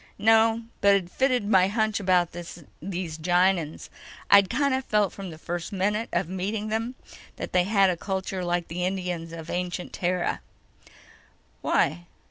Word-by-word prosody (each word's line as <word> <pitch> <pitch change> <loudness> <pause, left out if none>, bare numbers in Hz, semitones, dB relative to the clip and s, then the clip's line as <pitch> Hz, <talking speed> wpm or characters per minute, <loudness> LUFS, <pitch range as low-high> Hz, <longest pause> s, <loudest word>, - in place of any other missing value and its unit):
"No. 225 +2 +4 0.2
But 200 0 +6
it 180 -3 -2
fitted 255 -4 +1
my 190 -3 +5
hunch 220 +1 0
about 180 -3 +2
these 175 0 -7
Gienahns. 175 -1 +1 0.4
I'd 200 -1 +7
kind 280 +2 +1
of 265 0 0
felt 210 -5 +1
from 195 -2 -7
the 160 - -9
first 170 +4 -5
minute 210 +3 -1
of - - 0
meeting 205 +4 -3
them 225 +3 -2 0.4
that - - -6
they 180 -1 +3
had 195 -2 +4
a 175 - -3
culture 190 0 -3
like 175 -1 -1
the 175 +2 -4
Indians 180 -3 -3
of 165 0 -7
ancient 180 0 -3
Terra." 180 0 -1 1.2
"Why?" 170 +5 +1
185 Hz, 155 wpm, -26 LUFS, 175-210 Hz, 1.2 s, I'd